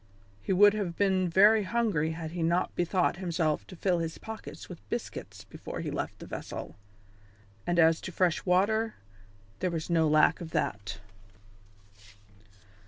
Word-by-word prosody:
He -, -, -3 dB
would 205 Hz, +2 st, +6 dB
have 195 Hz, -5 st, -3 dB
been 190 Hz, -2 st, +2 dB
very 210 Hz, +5 st, +6 dB
hungry 200 Hz, -7 st, 0 dB
had 160 Hz, -1 st, -6 dB
he 175 Hz, 0 st, -4 dB
not 170 Hz, +2 st, +1 dB
bethought 175 Hz, 0 st, +1 dB
himself 170 Hz, -4 st, -1 dB
to 185 Hz, -, -10 dB
fill 180 Hz, 0 st, +1 dB
his 165 Hz, -1 st, -3 dB
pockets 220 Hz, 0 st, -9 dB
with -, -, -9 dB
biscuits -, -, -5 dB
before -, -, -7 dB
he -, -, -4 dB
left -, -, -4 dB
the -, -, -10 dB
vessel. -, -, -7 dB, 0.9 s
And 175 Hz, -, +1 dB
as 165 Hz, -1 st, +5 dB
to 185 Hz, -, -6 dB
fresh 175 Hz, -2 st, +1 dB
water, 210 Hz, +5 st, +2 dB, 0.6 s
there 185 Hz, -, 0 dB
was 165 Hz, 0 st, -4 dB
no 165 Hz, -2 st, +3 dB
lack 155 Hz, +1 st, +4 dB
of 165 Hz, -, -6 dB
that. 100 Hz, -2 st, -2 dB
175 Hz, 155 wpm, -29 LUFS, 165-195 Hz, 0.9 s, would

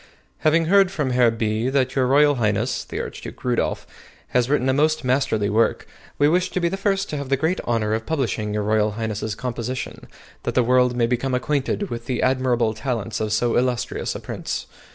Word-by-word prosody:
Having 160 Hz, +2 st, +3 dB
heard 195 Hz, +2 st, +5 dB
from 150 Hz, -9 st, -2 dB
Herr 125 Hz, -1 st, +4 dB
B. 110 Hz, +1 st, -1 dB
that 130 Hz, -1 st, 0 dB
Y.R. 140 Hz, +3 st, +4 dB
Highness 110 Hz, -6 st, 0 dB
[the -, -, -5 dB
Archduke -, -, -7 dB
Rudolph] 125 Hz, -1 st, -1 dB, 0.4 s
has 125 Hz, 0 st, +1 dB
written 140 Hz, -3 st, +2 dB
a 130 Hz, -, +3 dB
most 155 Hz, +2 st, +2 dB
masterly 130 Hz, -5 st, +1 dB
work, 110 Hz, +3 st, +1 dB, 0.3 s
we 145 Hz, -, +4 dB
wish 180 Hz, +4 st, +2 dB
to -, -, -2 dB
be 170 Hz, -1 st, +1 dB
the 195 Hz, -, -2 dB
first 195 Hz, 0 st, 0 dB
to 150 Hz, -, -2 dB
have 140 Hz, -2 st, -5 dB
the 135 Hz, -, +2 dB
great 160 Hz, +6 st, 0 dB
honor 110 Hz, -2 st, 0 dB
of 110 Hz, 0 st, -3 dB
publishing 120 Hz, -8 st, -1 dB
Y.R. 105 Hz, 0 st, +1 dB
Highness's 110 Hz, -1 st, -3 dB
composition, 125 Hz, +1 st, -5 dB, 0.3 s
that -, -, -3 dB
the 125 Hz, -, +4 dB
world 125 Hz, 0 st, +3 dB
may 120 Hz, -1 st, +2 dB
become 125 Hz, +2 st, 0 dB
acquainted 145 Hz, +8 st, -1 dB
with 115 Hz, 0 st, -5 dB
the 125 Hz, -2 st, -1 dB
admirable 125 Hz, -3 st, +2 dB
talents 115 Hz, -2 st, -3 dB
of 110 Hz, -1 st, -2 dB
so 115 Hz, +2 st, +1 dB
illustrious 125 Hz, -1 st, -1 dB
a -, -, -4 dB
Prince. -, -, -5 dB
125 Hz, 195 wpm, -22 LUFS, 115-145 Hz, 0.4 s, heard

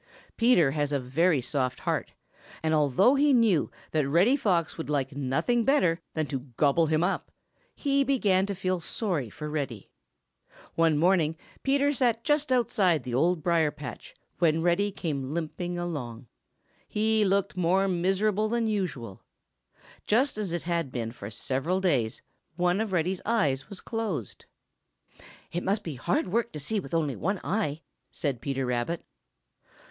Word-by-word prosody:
Peter 230 Hz, -, +4 dB
has 145 Hz, 0 st, -1 dB
a 140 Hz, -, +1 dB
very 145 Hz, +4 st, +2 dB
soft 125 Hz, -1 st, -2 dB
heart, -, -, -2 dB, 0.5 s
and 160 Hz, 0 st, +1 dB
although 150 Hz, -, +4 dB
he 285 Hz, 0 st, +4 dB
knew 220 Hz, -, +3 dB, 0.2 s
that 155 Hz, -3 st, +1 dB
Reddy 185 Hz, -, +4 dB
Fox 180 Hz, -, 0 dB
would 160 Hz, -, -6 dB
like 140 Hz, -2 st, -1 dB
nothing 145 Hz, -, +1 dB
better 180 Hz, -, +2 dB
than 155 Hz, -1 st, 0 dB
to 135 Hz, -2 st, -3 dB, 0.2 s
gobble 155 Hz, +3 st, +3 dB
him 155 Hz, +1 st, +2 dB
up, 195 Hz, +2 st, -1 dB, 0.4 s
he 280 Hz, -1 st, +2 dB
began 205 Hz, -9 st, +2 dB
to 200 Hz, -, -3 dB
feel 185 Hz, -1 st, -1 dB
sorry 170 Hz, -, -2 dB
for 150 Hz, +8 st, -7 dB
Reddy. 140 Hz, -9 st, -4 dB, 0.8 s
One 165 Hz, -2 st, +3 dB
morning 165 Hz, -1 st, +2 dB, 0.2 s
Peter 280 Hz, +1 st, +2 dB
sat 235 Hz, -4 st, +1 dB
just 295 Hz, -2 st, +1 dB
outside 200 Hz, -, +2 dB
the 125 Hz, -, -5 dB
Old 165 Hz, +5 st, +2 dB
Briar 165 Hz, -3 st, +3 dB
patch, 140 Hz, -5 st, -9 dB, 0.2 s
when 165 Hz, -1 st, +3 dB
Reddy 175 Hz, +4 st, +2 dB
came 145 Hz, -6 st, -3 dB
limping 175 Hz, +2 st, -3 dB
along. 140 Hz, -9 st, -5 dB, 0.6 s
He 220 Hz, 0 st, +2 dB
looked 195 Hz, -1 st, +1 dB
more 185 Hz, +2 st, +2 dB
miserable 195 Hz, +4 st, +1 dB
than 235 Hz, 0 st, 0 dB
usual. 155 Hz, -, -3 dB, 0.9 s
Just 250 Hz, +6 st, +2 dB
as 210 Hz, -4 st, -3 dB
it 170 Hz, -1 st, -2 dB
had 170 Hz, -5 st, -1 dB
been 115 Hz, -3 st, -3 dB
for 100 Hz, -4 st, -8 dB
several 135 Hz, -, -1 dB
days, 135 Hz, -13 st, 0 dB, 0.3 s
one 180 Hz, +3 st, +1 dB
of 220 Hz, -3 st, -2 dB
Reddy's 180 Hz, +1 st, 0 dB
eyes 200 Hz, -, 0 dB
was 200 Hz, -3 st, -6 dB
closed. 210 Hz, -, -4 dB, 1.1 s
"It 175 Hz, -, -2 dB
must 205 Hz, +2 st, 0 dB
be 160 Hz, -, -5 dB
hard 170 Hz, +8 st, -1 dB
work 235 Hz, +4 st, 0 dB
to 150 Hz, -, -5 dB
see 210 Hz, +9 st, -1 dB
with 165 Hz, -3 st, -5 dB
only 150 Hz, -5 st, 0 dB
one 195 Hz, +3 st, -1 dB
eye," 170 Hz, -7 st, -1 dB, 0.3 s
said 135 Hz, -6 st, -3 dB
Peter 135 Hz, -1 st, -2 dB
Rabbit. 125 Hz, +7 st, -2 dB
170 Hz, 155 wpm, -28 LUFS, 145-205 Hz, 1.1 s, Peter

